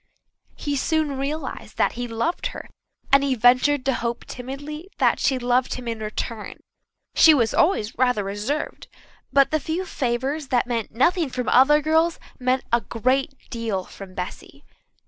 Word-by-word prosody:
He 290 -1 -3
soon 310 0 0
realized 295 +4 -4
that - - +3
he 245 0 -5
loved 235 +9 -1
her, - - -8 0.4
and 275 0 +6
he 275 -2 +1
ventured 255 +4 +4
to 270 - +2
hope 235 0 -3
timidly 285 +7 -7
that - - +3
she 265 - +2
loved 250 +1 +1
him 250 -1 -7
in 230 -1 -3
return. 215 0 -5 0.5
She 320 -2 +7
was 230 -5 +1
always 260 - +2
rather 250 -4 +2
reserved, 205 +10 -3 0.4
but 275 -1 +4
the 310 - +2
few 330 +5 -3
favours 270 +1 -2
that 245 -2 +2
meant 235 -3 -2
nothing 320 - +2
from 250 -1 -4
other 295 +4 +5
girls 320 +2 +2 0.2
meant 255 0 +1
a 235 - +4
great 260 +6 0 0.2
deal 225 -5 -2
from 185 0 -12
Bessy. 180 0 -7
255 Hz, 160 wpm, -23 LUFS, 235-295 Hz, 0.5 s, She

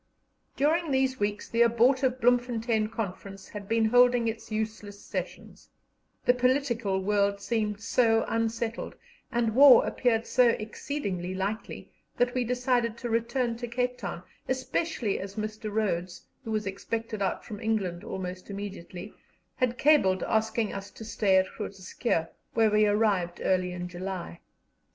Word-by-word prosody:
During 320 +4 +2
these 265 -1 +1
weeks 205 0 -2
the 230 - 0
abortive 250 +3 +3
Bloemfontein 235 -2 +2
Conference 195 -3 -6
had 205 -1 -8
been 225 0 +3
holding 245 +1 +5
its 225 0 -5
useless 215 -2 -4
sessions; - - -7 0.6
the 245 - +6
political 245 -6 +1
world 200 0 +1
seemed 210 -1 -1
so 225 -1 +3
unsettled, 230 0 -2 0.4
and 235 -2 +1
war 270 +1 +8
appeared 230 -2 +1
so 250 -2 +4
exceedingly 215 -5 -3
likely, 200 +4 -4 0.3
that 245 0 +2
we 255 - +1
decided 245 -1 0
to 240 0 -4
return 235 +1 0
to 240 0 -5
Cape 250 +1 -2
Town, - - -5 0.3
especially 260 - -1
as 195 +1 -7
Mr. 215 0 -4
Rhodes, 185 -4 -2 0.2
who - - -7
was 215 -1 -1
expected 215 +2 -4
out 195 - -1
from 210 -3 -8
England 195 -6 -1
almost 185 0 -6
immediately, 195 -1 -7 0.4
had 250 -1 0
cabled 230 -12 +4
asking 220 0 0
us 195 0 -6
to 220 - -11
stay 205 -3 +2
at 190 - +4
Groot - - -5
Schuurr, 185 -2 -1 0.3
where 220 -1 +4
we 210 0 +4
arrived 205 -5 +1
early 185 -1 +1
in 180 0 -5
July. 180 -1 -6
220 Hz, 145 wpm, -28 LUFS, 200-245 Hz, 0.6 s, war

